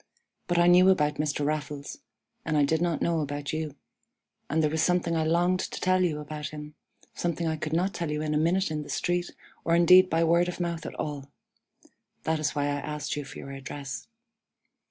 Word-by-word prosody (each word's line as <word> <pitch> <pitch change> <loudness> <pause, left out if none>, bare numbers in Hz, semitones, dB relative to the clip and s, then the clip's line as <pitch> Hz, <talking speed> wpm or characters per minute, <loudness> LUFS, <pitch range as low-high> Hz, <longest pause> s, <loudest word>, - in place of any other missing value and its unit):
But 175 - 0
I 175 - +5
knew 180 +2 +7
about 150 -6 +2
Mr. 150 -1 -1
Raffles, 150 - -3 0.4
and 155 -2 0
I 145 - +4
did 160 +3 +1
not 170 -3 0
know 170 -1 +1
about 145 -1 -3
you, 155 -2 -3 0.7
and 160 +2 +1
there 150 - +3
was 160 0 0
something 180 -2 +2
I 160 - +1
longed 175 +3 +2
to - - -4
tell 185 0 +2
you 155 -4 0
about 150 0 -5
him, 150 0 -9 0.4
something 170 -1 -2
I 160 -1 0
could 155 0 -4
not 180 +3 +1
tell 170 -2 -3
you 150 0 -2
in 155 0 -1
a - - +2
minute 175 +3 +1
in 155 -1 -2
the 150 - -10
street, 175 0 -1 0.3
or 165 - +2
indeed 180 +2 +7
by 165 +1 +2
word 170 +2 +3
of 180 - -5
mouth 170 -2 -3
at - - -7
all. 140 -2 -5 0.9
That 160 0 0
is 155 - -1
why 145 - 0
I 145 - 0
asked 150 +1 -4
you 145 - -3
for 140 - -10
your 140 - -8
address. 135 0 -7
160 Hz, 215 wpm, -27 LUFS, 150-175 Hz, 0.9 s, knew